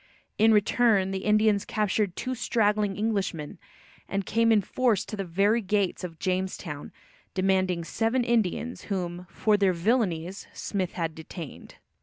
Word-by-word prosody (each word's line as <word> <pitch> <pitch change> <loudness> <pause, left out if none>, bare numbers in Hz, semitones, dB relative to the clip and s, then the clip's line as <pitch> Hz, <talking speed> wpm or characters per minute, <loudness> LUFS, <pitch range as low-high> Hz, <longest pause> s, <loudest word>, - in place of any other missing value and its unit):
In 225 +1 +6
return, 210 -2 +3
the 190 0 -4
Indians 215 -1 +3
captured 210 -3 0
two 255 - -3
straggling 210 -5 +1
Englishmen, 195 -8 -2 0.5
and 195 -1 -1
came 230 +3 +2
in 210 -3 +4
force 235 -2 +1
to - - -6
the 200 - -3
very 200 +6 +2
gates 200 -2 0
of 165 -3 -6
Jamestown, 185 -5 -3 0.4
demanding 185 -2 +1
seven 225 +8 0
Indians, 235 0 0
whom, 180 -2 -3
"for 215 -1 +2
their 195 -2 +3
villainies," 185 -2 0
Smith 190 -3 -3
had 165 -2 -2
detained. 160 0 -9
200 Hz, 140 wpm, -27 LUFS, 180-220 Hz, 0.5 s, In